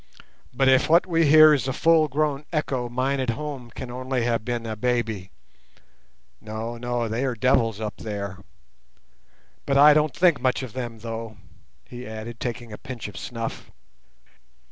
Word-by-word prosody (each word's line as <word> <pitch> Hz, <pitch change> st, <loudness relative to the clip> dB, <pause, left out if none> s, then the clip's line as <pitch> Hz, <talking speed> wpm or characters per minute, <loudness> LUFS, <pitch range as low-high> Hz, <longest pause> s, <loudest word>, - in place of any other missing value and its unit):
But 135 Hz, +2 st, +1 dB
if 130 Hz, +2 st, +4 dB
what 170 Hz, +2 st, +5 dB
we 165 Hz, -3 st, +2 dB
hear 155 Hz, +1 st, +8 dB
is 135 Hz, -3 st, 0 dB
a 130 Hz, -, -1 dB
full 160 Hz, +1 st, +4 dB
grown 145 Hz, 0 st, -1 dB
echo, 130 Hz, -6 st, -1 dB
mine 130 Hz, +3 st, -1 dB
at 130 Hz, -2 st, -1 dB
home 135 Hz, -1 st, -4 dB
can 120 Hz, +1 st, -8 dB
only 130 Hz, 0 st, -2 dB
have 115 Hz, -2 st, 0 dB
been 120 Hz, 0 st, -3 dB
a 110 Hz, -1 st, -4 dB
baby. 110 Hz, -4 st, -1 dB, 1.1 s
No, 110 Hz, +2 st, -5 dB
no—they 120 Hz, 0 st, -2 dB
are 130 Hz, -3 st, -1 dB
devils 115 Hz, -2 st, +2 dB
up 105 Hz, -1 st, -5 dB
there. 100 Hz, -3 st, -5 dB, 1.3 s
But 140 Hz, -, +2 dB
I 150 Hz, +2 st, +8 dB
don't 150 Hz, 0 st, +1 dB
think 175 Hz, -5 st, +3 dB
much 130 Hz, +1 st, +1 dB
of 125 Hz, -, -8 dB
them, 120 Hz, -3 st, -5 dB
though," 115 Hz, -1 st, -6 dB, 0.5 s
he 125 Hz, -1 st, -9 dB
added, 110 Hz, +1 st, -7 dB
taking 120 Hz, -2 st, -5 dB
a -, -, -9 dB
pinch 125 Hz, -4 st, -7 dB
of 105 Hz, -, -11 dB
snuff. 115 Hz, +2 st, -6 dB
125 Hz, 165 wpm, -24 LUFS, 115-140 Hz, 1.3 s, hear